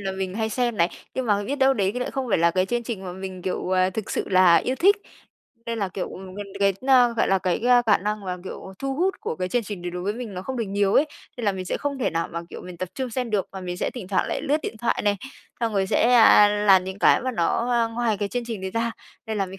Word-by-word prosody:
là 195 -1 -3
mình 190 0 -4
hay 220 0 -1
xem 240 0 0
này, 170 -2 +3 0.3
nhưng 260 -1 -2
mà 205 -2 +2
biết 280 +5 -2
đâu 270 -1 +4
đấy 200 -3 0
lại 250 - -2
không 265 -2 -3
phải 200 - +2
là 170 +1 +4
cái 185 +2 +1
chương 240 +1 -1
trình 215 -5 -5
mà 180 - -5
mình, 190 -1 -7
kiểu, 185 0 -3
à, 185 0 +3
thực 215 +2 -5
sự - - -2
là 185 -2 +6
yêu 255 +8 0
thích. 395 - +5 0.7
Nên 230 -1 -3
là, 200 - -1
kiểu, 185 0 -4
ừm, 185 0 -9
gần 205 0 -6
đến, 195 -1 +3 0.4
gọi - - +2
là, 195 - +3
cái, 180 -1 0
a, 245 0 +5
cả 215 -3 +4
năng 210 +1 -3
mà, 180 -1 -3
kiểu, 190 0 -8
thu 270 0 -2
hút 370 +6 +1
của 155 - -4
cái 185 0 -2
chương 245 +2 0
trình 200 -4 -7
đấy 175 - -3
đối 180 0 -5
với 205 +2 -1
mình 230 -4 -6
nó 180 - -5
không 260 +3 -5
được 230 - -1
nhiều 200 0 +1
ấy, 295 - +5 0.3
nên 240 - -5
là 200 - +2
mình 185 -1 -5
sẽ 185 - -2
không 285 -2 -3
thể 245 - 0
nào 165 0 -2
mà, 170 - -3
kiểu, - - -8
mình 180 -1 -9
tập 185 +1 -4
trung 260 -3 -3
xem 245 -1 -3
được, 205 -3 0
và 190 - -6
mình 180 -1 -5
sẽ - - -2
thỉnh 205 -7 -7
thoảng 190 - +1
lại - - -2
lướt 295 0 +2
điện - - -5
thoại 235 - 0
này, 205 -1 +2 0.4
xong 230 -2 0
rồi 190 -1 +1
sẽ, 240 +5 +3
a, 215 -3 +8
làm 205 -3 +4
những 190 +1 -6
cái - - +5
mà 255 - -1
nó, 230 +6 0
à, 235 -1 +3
ngoài 230 -2 0
cái 205 -1 -1
chương 245 +1 -3
trình 225 -5 -5
đấy 190 0 -4
ra, 230 +1 -1 0.3
nên 220 -1 -3
là 195 - 0
mình 190 +1 -10
205 Hz, 300 wpm, -24 LUFS, 185-240 Hz, 0.7 s, a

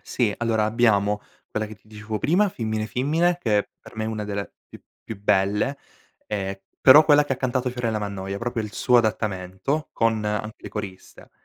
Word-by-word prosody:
Sì. 115 -5 0
Allora 115 -2 +1
abbiamo, 105 -2 +2 0.3
quella 110 0 -2
che 110 - -10
ti 105 +1 -26
dicevo 110 0 -5
prima, 190 - +3
Fimmine 110 -7 -3
Fimmine, 160 +9 +1
che 105 -6 +1
per - - -15
me 110 - -2
è - - -2
una 110 -1 -3
delle 100 -1 -4 0.2
più - - -13 0.2
più 105 -3 -8
belle, 100 +7 +1 0.5
ehm, 95 -2 -3 0.3
però 145 +4 +9
quella 145 -1 +5
che 140 - -2
ha 130 - -1
cantato 130 -1 -1
Fiorella 115 -3 -2
Mannoia, 100 -1 -4
proprio 115 0 -2
il 105 - -7
suo 125 -1 +4
adattamento, 110 +6 -1
con 115 -2 +1
anche 105 +1 -2
le - - -8
coriste; 100 -2 -8
110 Hz, 185 wpm, -24 LUFS, 105-125 Hz, 0.5 s, però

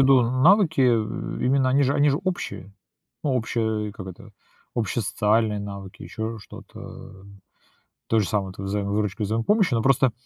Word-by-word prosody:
в 135 - +6
виду: 130 -2 +6
навыки, 155 - +4
э, 115 -3 +1
именно 130 0 +3
они 140 +2 +3
же 140 +1 +2
они 145 0 +4
же 140 - +1
общие. 100 - -4 0.5
Ну 145 - 0
общие 110 -3 -1
Как 95 -3 -9
это? 90 - -10 0.4
Общие 115 0 -1
социальные 105 +1 +1
навыки, 100 -2 -8
еще 110 +1 -5
что-то, 105 - -12
э. 95 0 -11 0.8
То 115 - +3
же 100 - +1
самое- 100 -3 -1
это 95 +1 -9
взаимовыручка 100 +1 -1
и - - +1
взаимопомощь, 145 - +2
но 115 - +2
просто, 130 0 +3
110 Hz, 170 wpm, -24 LUFS, 100-130 Hz, 0.8 s, в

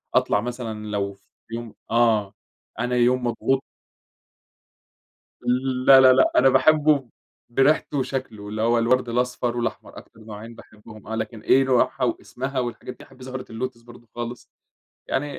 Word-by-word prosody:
أطلع 105 - +3
مثلًا 115 -3 -5
لو 100 -1 -2
في 100 - -28 0.3
يوم 115 -2 -7 0.2
آه، 110 -4 +2 0.5
أنا 125 +1 -1
يوم 125 +1 +2
مضغوط 130 +3 0 2.2
لا، 135 -1 +9
لا، 130 -1 +8
لا 130 - +4
أنا 135 +1 +6
باحبه 145 -1 +3 0.4
بريحتُه 140 +3 +2
وشكلُه 130 -6 -4
اللي 110 +1 -4
هو 115 +1 +3
الوَرْد 125 +1 +1
الأصفر 125 0 -1
والأحمر، 120 - -4
أكتر - - -14
نوعين 110 +1 -10
باحبهم 110 -1 -15
آه، 110 - -3
لكن 110 0 -5
إيه 135 +1 +4
نوعها 130 0 +1
واسمها 130 +2 -3
والحاجات 120 +1 -5
دي، - - -13
أحب 130 -1 -18
زهرة 130 0 -6
اللوتس 120 +1 -5
برضه 120 0 -16
خالص، 120 0 -6 0.6
يعني 145 +1 -2
120 Hz, 145 wpm, -23 LUFS, 115-130 Hz, 2.2 s, لا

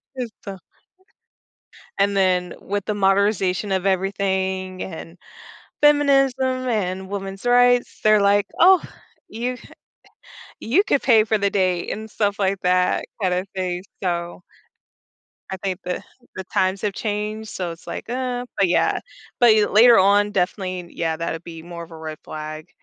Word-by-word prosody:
It's 245 -3 -4
the 195 -1 -7 1.4
and 200 0 +2
then 180 -2 +1
with 200 0 -3
the 210 - -1
modernization 195 -1 +1
of 190 0 0
everything, 190 -1 -1
and 165 0 -9 0.6
feminism, 280 -3 +4 0.3
and 190 -5 -2
women's 195 +1 -6
rights, 245 0 +3
they're, 215 -1 +5
like, 200 0 +3
"Oh, 370 +1 +7 0.5
you 245 +3 -4
c - - -16 0.9
you 270 - +2
could 285 - +1
pay 225 -4 +5
for 220 -1 +1
the 200 0 +1
date" 185 -3 0
and 220 0 -7
stuff 205 -2 -1
like 195 -1 0
that 180 0 +1 0.2
kinda 180 -2 0
thing, 180 -1 -3 0.2
so 175 -1 -3 1.1
I 190 - -4
think 190 -1 -4
the 180 - -3 0.3
the 190 - -5
times 190 +1 0
have 205 -2 -1
changed, 215 +1 -4
so 180 -4 -4
it's, 165 - -13
like, - - -6
"Uh" 250 0 -3
But 195 - +3
yeah, 175 - +2 0.4
but 240 -3 +7
you 210 -1 +3
later 235 +3 +7
on, 205 +2 +4
definitely 185 -2 -2
yeah, 165 -1 -2
that'd 165 0 -4
be 165 -1 -9
more 170 -1 -8
of 170 - -14
a 165 - -10
red 155 -1 -7
flag, 155 0 -7
195 Hz, 150 wpm, -22 LUFS, 180-215 Hz, 1.4 s, Oh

